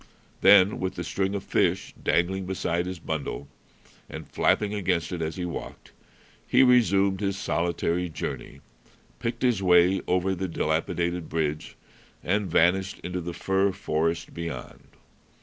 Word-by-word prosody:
Then, 100 0 +6
with 95 0 -3
the 85 - -4
string 95 +3 -1
of 100 - -4
fish - - 0
dangling 95 +2 0
beside 90 -2 -1
his 90 0 -5
bundle 80 -3 -4 0.6
and - - -8
flapping 105 -1 +1
against 90 -4 -1
it 90 -2 -4
as 80 0 -3
he 90 -2 -3
walked, 85 - -7 0.6
he - - +5
resumed 100 -6 +4
his 100 -1 -1
solitary 85 0 -1
journey, 80 - -6 0.6
picked 115 +1 -3
his 120 -6 +2
way 90 0 +4
over 90 +1 +1
the 95 +1 -3
dilapidated 85 0 -1
bridge, 75 -1 -2 0.5
and 100 +1 0
vanished 95 +4 +2
into 90 0 -3
the 85 +1 -5
fir 95 +1 +1
forest 80 -3 -2
beyond. 85 -1 -7
90 Hz, 140 wpm, -26 LUFS, 85-95 Hz, 0.6 s, Then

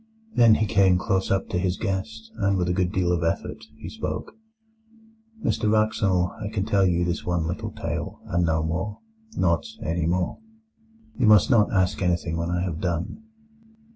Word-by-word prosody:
Then 115 -2 +6
he 110 - +1
came 100 -4 +4
close 95 +1 0
up 95 0 +1
to 90 - -1
his 90 0 0
guest, 110 +3 -4
and 100 -2 +1
with 90 -1 0
a 90 - +1
good 90 -1 0
deal 90 -1 +1
of 85 -1 0
effort 85 - -2
he - - -9
spoke: - - -5 1.1
"Mr 105 -3 +1
Wraxall, 105 -5 +2
I - - -2
can 105 -2 -2
tell 100 -3 +3
you 85 0 +1
this 85 0 -2
one 85 -2 -1
little 85 +2 -3
tale, - - -5
and 85 +1 0
no 80 -2 +1
more—not 105 - -2 0.2
any 80 0 -1
more. 90 +1 -1 0.8
You 120 - +3
must 105 +2 +6
not 110 -4 +4
ask 95 0 +1
anything 85 -2 0
when 85 +1 -2
I 90 0 0
have 85 -4 -3
done. 90 - -2
95 Hz, 175 wpm, -25 LUFS, 85-105 Hz, 1.1 s, Then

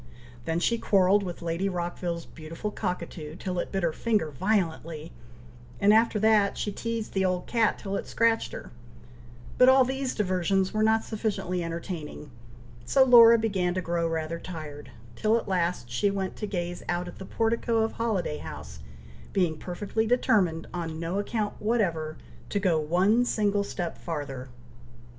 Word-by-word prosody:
Then 165 +1 0
she 235 +6 +1
quarrelled 195 0 +4
with 175 -3 -6
Lady 170 +4 -1
Rockville's 175 -1 -3
beautiful 165 +6 -6
cockatoo, 170 -5 -4
till 180 0 -3
it - - -3
bit 195 -2 -1
her 165 -2 +1
finger 210 -8 0
violently, 165 -2 -1 0.7
and 205 +1 +5
after 225 0 +4
that, 215 -2 +4
she 205 - -2
teazed 230 +1 -4
the 190 - +1
old 185 -1 0
cat 230 -2 +2
till 195 0 -4
it - - -3
scratched 230 0 +1
her; - - -8 0.9
but 255 - +8
all 260 0 +6
these 265 0 -2
diversions 190 -1 +1
were 215 - 0
not 220 +1 +3
sufficiently 195 -5 -2
entertaining, 165 -3 -6 0.5
so 265 - +4
Laura 235 -2 +8
began 190 -5 0
to 185 - 0
grow 170 0 0
rather 165 0 -3
tired, 155 -5 -8 0.3
till 220 - +2
at 230 - -4
last 175 -8 0
she 120 +12 +1
went 195 -1 -3
to 210 - -4
gaze 175 -3 -3
out 175 +1 -1
at - - -10
the - - -6
portico 225 +1 +1
of 225 - -1
Holiday 205 - -1
House, 70 -2 -8 0.5
being 175 -5 +2
perfectly 205 +7 -2
determined, 195 -9 +2
on 165 -2 -4
no 170 +4 -2
account 210 0 -2
whatever, 175 -9 0 0.3
to 205 - 0
go 180 -5 +2
one 185 +10 +3
single 205 -4 +1
step 175 -4 -5
farther. 140 -6 -5
185 Hz, 160 wpm, -27 LUFS, 165-215 Hz, 0.9 s, but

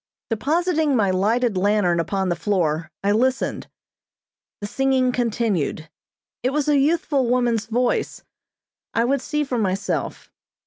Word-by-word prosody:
Depositing 310 +4 +1
my 205 -5 +2
lighted 220 +4 +1
lantern 185 -2 +2
upon 190 +3 -1
the 175 - +1
floor, 165 -5 -1
I 200 - +2
listened. 255 +5 0 0.9
The 205 - -5
singing 260 +3 +1
continued. 215 - -1 0.5
It 250 - +1
was 295 0 -1
a 290 -2 +4
youthful 295 -3 +1
woman's 240 -3 +1
voice. 240 +2 -1 0.7
I 230 - +3
would 275 +1 +1
see 300 +1 -1
for 255 -4 -2
myself. 195 -1 -2
235 Hz, 130 wpm, -22 LUFS, 200-270 Hz, 0.9 s, a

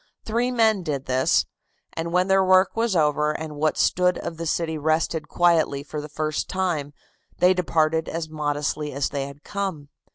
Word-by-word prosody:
Three 235 +3 0
men 220 -5 +2
did 145 -6 -3
this, 130 +1 +2 0.5
and 165 +1 -4
when 180 +1 +2
their 195 0 +4
work 185 0 +4
was 225 -3 0
over 150 -1 +2
and 155 -1 -6
what 155 +1 0
stood 180 0 +2
of 165 - -6
the 165 0 -4
city 160 0 -1
rested 155 +1 0
quietly 165 -5 +2
for 150 +1 -6
the 150 - -9
first 155 +1 -2
time, 175 -7 -1 0.5
they 180 +1 +5
departed 160 -3 +1
as 165 -1 -3
modestly 150 -1 -2
as 140 +1 -1
they 140 -1 -3
had 140 +1 -12
come. 190 -8 -4
160 Hz, 175 wpm, -24 LUFS, 150-180 Hz, 0.5 s, they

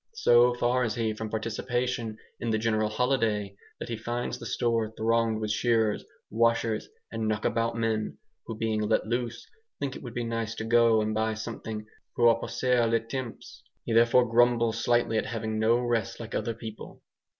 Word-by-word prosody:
So 120 - +5
far 125 +1 +1
is 115 -1 -1
he 115 -2 0
from 110 0 -5
participation 115 +1 -2 0.2
in 115 - -2
the 110 - +2
general 110 -1 +1
holiday 110 -4 0 0.2
that - - -5
he 115 - -3
finds 120 +2 -3
the - - -6
store 115 -2 0
thronged 115 0 +1
with 110 -1 -2
shearers, 110 -2 +1 0.3
washers, 115 -1 +1 0.2
and 115 -1 -2
"knock 110 0 -1
about 115 0 0
men," 110 -1 -1 0.3
who 115 - -5
being 110 -1 0
let 105 - +1
loose, 120 +1 -3 0.3
think 135 -2 -3
it - - -8
would 120 -2 -8
be 120 - -1
nice 115 -1 -3
to 110 - -4
go 115 -1 +4
and 110 0 -1
buy 110 0 0
something 110 -1 -6 0.3
"pour 115 -1 +5
passer 120 0 +1
le 115 0 +2
temps." 115 +1 -7 0.2
He 115 - -1
therefore 120 +2 +5
grumbles 115 -1 +3
slightly 120 -2 +2
at - - -3
having 110 -1 -3
no 115 +2 +4
rest 120 -2 -1
like 115 -1 -7
other 115 -1 -2
people. 110 -1 -9
115 Hz, 180 wpm, -28 LUFS, 110-120 Hz, 0.3 s, So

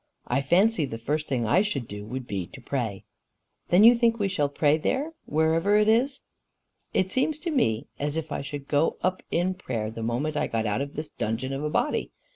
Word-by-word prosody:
I 135 +3 0
fancy 180 +4 +3
the 115 -4 -6
first 150 +7 -2
thing 125 -4 0
I 170 - +4
should 140 - -2
do 105 0 -7
would 130 +2 -5
be 95 -6 -4
to - - -12
pray." 120 -6 -3 0.7
"Then 180 +4 +6
you 235 +2 +10
think 235 -1 +2
we 205 -3 +1
shall 150 -7 0
pray 145 +1 +3
there 275 - -1 0.2
wherever 160 +6 +3
it 210 0 +3
is?" 255 +5 +2 0.7
"It 190 0 +1
seems 275 +6 +1
to 340 - -2
me 115 - +1
as 145 +2 -1
if 160 -1 -4
I - - -2
should 140 0 -7
go 145 +2 +1
up 185 0 0
in 180 +2 +1
prayer 115 - -4
the 115 - -7
moment 125 +7 -1
I - - 0
got 115 -1 -1
out 105 +4 0
of 140 0 -5
this 155 0 -4
dungeon 115 +5 -3
of 135 +2 -3
a 150 - 0
body. 295 - 0
150 Hz, 220 wpm, -26 LUFS, 125-190 Hz, 0.7 s, you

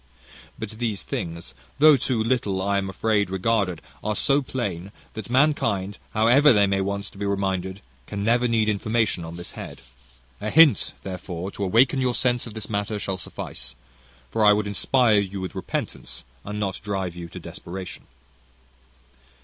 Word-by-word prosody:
"But 110 - -5
these 110 -2 -2
things, 85 0 -5 0.2
though 150 +1 +8
too 125 -3 0
little, 110 -5 0
I 100 +1 +1
am 95 -1 -3
afraid, 100 +1 +1
regarded, 95 -2 0 0.2
are 105 0 -1
so 140 +5 +3
plain, 100 -9 -4 0.2
that 110 +2 -7
mankind, 115 -8 +2 0.2
however 125 +7 +6
they 105 -4 +5
may 95 0 +1
want 100 +1 -2
to 100 - -14
be 100 - -2
reminded, 95 -1 -1 0.3
can 100 -1 -4
never 120 +3 +3
need 115 -2 +2
information 110 -3 +1
on 80 +1 -7
this 85 0 -8
head. - - -9 0.6
A 105 - -2
hint, 155 - +6
therefore, 90 0 -5
to 100 - -5
awaken 125 +7 +4
your 125 -2 +1
sense 125 -1 +1
of 110 - -10
this 110 -1 -5
matter, 105 0 -2
shall 95 -2 -3
suffice; 60 -6 -6 0.6
for 110 - +1
I 105 0 +8
would 105 0 0
inspire 110 +2 +3
you 100 -1 -3
with 95 -2 -5
repentance, - - -4 0.2
and 105 +1 -5
not 100 -3 -2
drive 95 -4 -2
you 85 -1 -7
to - - -8
desperation. 90 +1 -8
105 Hz, 165 wpm, -24 LUFS, 95-115 Hz, 0.6 s, though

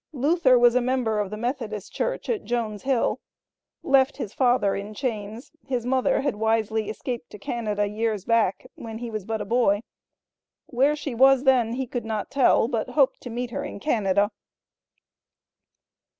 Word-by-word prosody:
Luther 280 -1 +3
was 240 -1 +5
a 250 - +3
member 240 -4 0
of 205 -2 -1
the 210 - -6
Methodist 225 -4 -4
church - - -2
at 450 -4 -1
Jones 225 -4 -2
Hill. 265 -3 0 0.6
Left 270 0 +3
his 210 - -5
father 245 -6 +2
in 205 +2 -6
chains; 220 -1 -4 0.2
his 250 -3 -2
mother 260 0 +1
had 270 -6 -1
wisely 220 -1 0
escaped 240 +2 -5
to - - -10
Canada 210 -1 -2
years 210 -1 -2
back, 230 -4 +1
when 225 -1 -8
he 235 0 -6
was 215 -3 -5
but 220 0 -3
a - - -4
boy. 220 -2 +2 0.8
Where 275 +4 +2
she 290 -3 -5
was 265 +2 +5
then, 250 -4 +3
he 265 +1 -2
could 245 0 -4
not 220 -2 -4
tell, 260 -4 +4
but 230 -4 -2
hoped 275 -3 +2
to 245 - -7
meet 240 +1 -4
her 280 - -3
in 290 - -7
Canada. 205 -5 +1
235 Hz, 170 wpm, -25 LUFS, 215-260 Hz, 0.8 s, was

